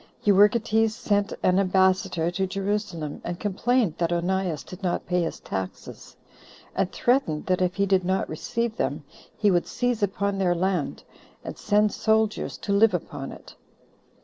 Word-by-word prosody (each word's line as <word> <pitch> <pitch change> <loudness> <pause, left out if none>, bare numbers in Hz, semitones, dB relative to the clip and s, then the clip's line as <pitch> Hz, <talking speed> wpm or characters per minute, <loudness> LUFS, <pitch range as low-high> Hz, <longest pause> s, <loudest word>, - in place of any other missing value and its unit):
Euergetes 215 +2 +4
sent 205 -2 0
an 185 +1 +4
ambassador 185 -2 +2
to 190 +2 -1
Jerusalem, 195 -6 -3
and 175 0 -5
complained 210 -2 0
that 170 -1 0
Onias 175 -3 -1
did 185 +8 -11
not 180 -3 -1
pay 180 0 +1
his 165 - -3
taxes, 95 -1 -7 0.6
and 195 -1 0
threatened, 240 - +1
that 185 0 +1
if 180 0 +1
he 200 - +2
did 190 -1 +2
not 190 +2 0
receive 230 +8 -3
them, - - -2 0.3
he 205 -2 +3
would 175 -1 +1
seize 245 -3 -1
upon 200 0 -1
their 180 -2 +2
land, 180 -3 -1 0.4
and - - -6
send 210 0 +2
soldiers 220 0 0
to 200 - -2
live 215 +2 +5
upon - - -5
it. - - -13
195 Hz, 155 wpm, -25 LUFS, 180-210 Hz, 0.6 s, live